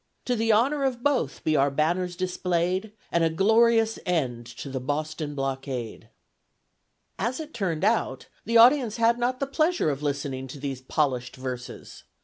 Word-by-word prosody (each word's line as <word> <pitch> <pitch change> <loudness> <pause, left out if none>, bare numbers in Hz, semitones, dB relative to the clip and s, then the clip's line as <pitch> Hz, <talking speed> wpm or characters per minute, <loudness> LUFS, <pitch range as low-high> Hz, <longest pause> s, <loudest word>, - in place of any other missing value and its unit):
To 250 - +1
the 225 0 +2
Honour 270 +7 +2
of 250 -3 -1
both 260 - 0
be 155 - +2
our 140 0 +4
Banners 175 +5 0
display'd, 180 +2 -1 0.2
And 170 - +2
a 165 - +3
glorious 225 +5 +3
End 130 -10 -1
to - - -8
the 135 -1 -3
BOSTON 150 +2 -3
BLOCKADE. 135 -4 -4 1.1
As 245 +5 -1
it 315 -1 -7
turned 185 -7 -2
out, 210 - 0 0.2
the 230 +1 +2
audience 245 -1 +6
had 230 +1 +3
not 250 +1 0
the 275 - 0
pleasure 310 - +1
of 140 0 -5
listening 140 -2 -3
to 135 +2 -9
these 135 -2 -4
polished 130 -2 -1
verses. 130 -1 -7
170 Hz, 160 wpm, -26 LUFS, 135-230 Hz, 1.1 s, audience